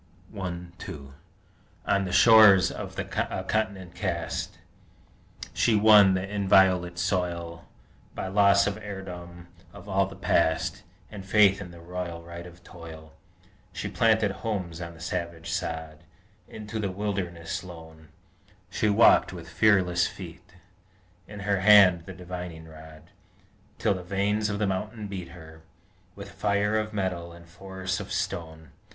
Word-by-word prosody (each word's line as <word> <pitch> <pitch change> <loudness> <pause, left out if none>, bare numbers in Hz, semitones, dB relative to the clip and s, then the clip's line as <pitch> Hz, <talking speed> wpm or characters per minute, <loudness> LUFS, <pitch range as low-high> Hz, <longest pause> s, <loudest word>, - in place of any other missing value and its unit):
I 90 -3 -4 0.2
2 70 -2 -9 0.7
On 100 -1 +1
the 90 - -4
shores 105 -2 +7
of - - -8
a - - -1 0.4
Continent 95 -5 -2
cast, - - -4 1.0
She 115 - +2
won 105 -2 +6
the 95 +1 -2
inviolate 95 -3 +3
soil 85 -2 -2 0.5
By - - -4
loss 100 0 +4
of 100 0 -2
heirdom 90 -4 -9 0.2
of 100 0 -13
all 95 -1 +1
the 95 - -11
Past, 85 -4 0 0.3
And 100 -2 -8
faith 100 0 +4
in 90 - -8
the 85 0 -13
royal 85 -1 -6
right 85 +1 -9
of 85 0 -16
Toil! 80 -2 -12 0.6
She - - -4
planted 110 -2 +2
homes 95 -6 -4
on 85 0 -7
the - - -16
savage 85 -1 -5
sod: 80 -1 -4 0.4
Into 110 0 -7
the 100 -2 -1
wilderness 95 -4 -4
lone 80 -3 -12 0.6
She 110 - 0
walked 105 +3 +5
with 85 -2 -9
fearless 90 0 +3
feet, 90 0 -11 0.7
In 105 -1 -9
her 100 -1 0
hand 95 -4 +6
the 95 - -7
divining 90 -2 -8
rod, 80 +2 -14 0.7
Till 110 -3 +1
the 95 - -6
veins 100 +3 0
of 100 - -2
the 105 - 0
mountains 105 +2 -4
beat 90 -3 -6 0.8
With - - -10
fire 100 +1 0
of 110 0 -4
metal 90 -4 -3
and 85 0 -15
force 95 +1 -5
of - - -8
stone! 80 -3 -4
95 Hz, 140 wpm, -26 LUFS, 85-100 Hz, 1.0 s, shores